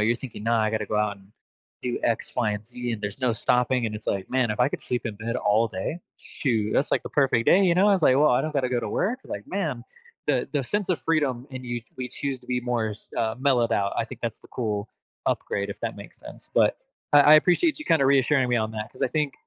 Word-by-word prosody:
you're 115 +3 +2
thinking, 115 -4 -8
"No, 115 - +1
I 110 -1 +2
gotta 110 -1 -1
go 105 - -2
out 105 -1 0
and 100 +1 -21 0.5
do 125 -1 -2
X, 115 - -1
Y, 120 -4 +2
and 105 0 -5
Z, 120 0 -4
and 110 - -4
there's 105 +6 -5
no 125 -2 +2
stopping," 125 +2 +1
and 110 - -4
it's 105 - -8
like, 95 -1 -2
"Man, 125 -3 +1
if 105 +3 -2
I 125 - +5
could - - -5
sleep 125 -1 -2
in 110 - -4
bed 115 +3 -3
all 110 -1 +2
day, 110 - -4 0.2
shoot, 110 -6 -1
that's 140 - +1
like - - +1
the - - -6
perfect 135 -5 +2
day," 195 - +6
you 175 -2 +4
know? 195 +3 +4
I - - +5
was 185 - -1
like, 130 - +5
"Well, 150 +2 +5
I 125 - +3
don't 155 0 -3
gotta 135 -3 0
go 125 -1 0
to - - -4
work." 245 +7 -1
Like, 100 - -6
man, 150 -11 -3 0.4
the 135 -4 +1
the 145 - +1
sense 205 +9 -2
of 180 - +1
freedom 140 -6 0
and 130 -1 -7
you 120 -1 -3 0.2
we 125 -1 -4
choose 135 +1 -3
to 125 - -21
be 125 -1 -1
more 120 -3 -1
s 105 - -10
uh, 110 -1 0
mellowed 130 -4 +2
out, 100 -1 +1
I - - +1
think 120 0 -10
that's 115 -2 -3
the - - -18
cool 105 -3 -3 0.4
upgrade, 100 0 -1
if - - -7
that - - -3
makes - - -12
sense, - - -12
but, - - +4 0.4
I 145 - +9
I - - +11
appreciate 185 - +3
you 305 - -7
kinda 160 -4 +4
reassuring 135 -1 +3
me 120 - +3
on 110 -1 0
that 110 0 -6
'cause - - -8
I - - +3
think 150 +1 -1
125 Hz, 270 wpm, -25 LUFS, 110-140 Hz, 0.5 s, I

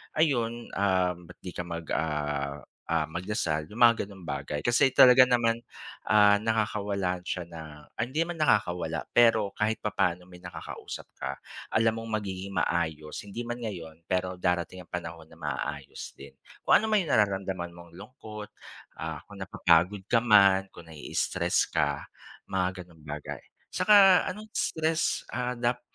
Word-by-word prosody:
ayun, 120 -7 +1
ah, 95 -2 +2
ba't 90 +1 -14
di 90 - -6
ka 90 - -3
mag 85 0 -5
ah 75 -2 -2 0.2
ah, 80 -2 0
magdasal 85 -2 -2
yung 110 - -9
mga 120 -1 +6
ganong 95 -4 -13
bagay. 70 +1 -3
Kasi 120 - +3
talaga 130 0 +8
naman, 120 -2 +2 0.5
ah, 105 0 +5
nakakawalan 100 -4 -1
siya 90 -1 -4
ng 80 -2 -9 0.3
ay - - +1
hindi 155 - 0
naman 175 -1 -5
nakakawala, 90 - 0
pero 115 -4 +4
kahit 110 +1 0
papaano 90 -4 -1
may 90 0 -15
nakakausap 90 - -8
ka. - - -5 0.3
Alam 115 0 +2
mong 110 -1 -2
magiging 95 -1 -6
maayos 80 -4 -1
hindi 105 +3 -6
man 120 0 -5
ngayon, 85 -6 -7
pero 90 0 -1
darating 90 0 -1
ang - - -28
panahon 85 -2 -6
na - - -16
maaayos 75 -2 -5
din. 70 0 -12 0.3
Kung - - +4
ano 215 - +4
man 215 - +5
yung 165 - -3
nararamdaman 95 -4 0
mong 85 0 -14
lungkot, 105 -1 -10 0.5
ah, 80 -1 -5
kung 100 -1 -13
napapagod 90 +1 +2
ka 115 - +3
man 100 -4 +5
kung 85 - -13
nai-stress 80 -3 -1
ka 70 -1 0 0.5
mga 95 -1 -1
ganung 85 -2 -20
bagay. 75 0 -6 0.3
Saka 195 -3 +6
anong 215 +3 -8
stress, 160 0 0
ah, 125 0 -2
dap 120 +1 0
95 Hz, 155 wpm, -28 LUFS, 85-115 Hz, 0.5 s, talaga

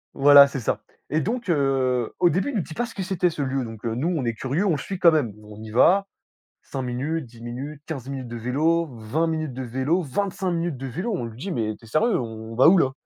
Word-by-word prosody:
Voilà, 140 0 +8
c'est 140 -1 -5
ça. 115 - -1 0.3
Et 155 +2 +1
donc, 235 +2 -3
heu 135 -6 +1
au 175 - +5
début, 185 - 0
il 280 - -4
nous 205 - +1
dit 160 - -8
pas 240 - 0
ce 230 - -10
que 190 - -3
c'était, 180 -2 +1
ce 160 -3 -5
lieu. 135 -1 -1
Donc, 110 -1 -9
heu, 115 -1 -1
nous 140 +7 -1
on 155 -8 -1
est 115 - 0
curieux, 135 - -1
on 195 - +3
le 155 - +1
suit 190 +5 -5
quand 170 -2 +7
même. 145 -9 +1
On 105 0 -11
y 110 -1 -8
va, 190 - +4 0.5
5 135 - -5
minutes, 135 +6 -2
10 115 -1 -16
minutes, 135 +5 -6
15 135 -5 -6
minutes 130 -2 -5
de 120 0 -6
vélo, 155 +8 +1
20 115 +10 -1
minutes 155 -4 -2
de 130 - -5
vélo, 130 +9 0
25 185 +5 -2
minutes 170 -4 -2
de 135 +1 -5
vélo, 175 - -3
on 120 - -3
lui 115 0 -9
dit: 190 +6 -4
«Mais 110 -6 -1
tu - - -18
es - - -14
sérieux, 210 - +2
on 115 -1 -6
va 130 +6 +7
où 190 - +6
là? 135 -6 +3
140 Hz, 265 wpm, -24 LUFS, 120-170 Hz, 0.5 s, Voilà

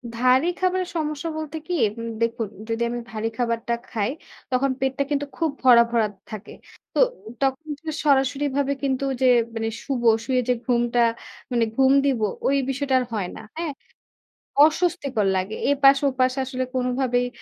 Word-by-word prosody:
ভারী 255 +6 +3
খাবারের 370 -1 0
সমস্যা 305 0 -2
বলতে 315 0 -5
কি? 360 - -2 0.3
উম 230 - -4
দেখুন 230 -1 0 0.2
যদি 225 +1 -2
আমি 240 0 -3
ভারী 220 +1 -2
খাবারটা 235 -1 -1 0.2
খাই 220 -1 -1 0.4
তখন 260 +1 +2
পেটটা 265 +1 0
কিন্তু 290 0 0
খুব 325 -3 0
ভরা, 240 -2 +8
ভরা 225 -3 +2 0.2
থাকে। 215 -1 -8 0.4
তো - - 0 0.4
তখন 270 +3 0
জ - - -55 0.2
সরাসরি 280 0 +3
ভাবে 280 0 +1
কিন্তু 270 0 0 0.2
যে, - - +4 0.3
মানে 225 0 -1
শুবো 240 -4 +1 0.2
শুয়ে 255 0 +1
যে, - - +5
ঘুমটা 240 -1 +1 0.5
মানে 235 -2 +2
ঘুম 265 0 +4
দিব 265 -5 +1 0.3
ওই 280 - +3
বিষয়টা 270 0 -1
আর 250 - -2
হয় 195 -4 -1
না। - - -8 0.2
হ্যাঁ? 330 -3 -2 0.9
অস্বস্তিকর 305 - +1
লাগে। 185 +3 -2 0.2
এপাশে 275 0 +5
ওপাশে 255 +1 +1
আসলে 255 0 -3
কোনভাবেই 250 -1 0
260 Hz, 160 wpm, -23 LUFS, 235-280 Hz, 0.9 s, ভরা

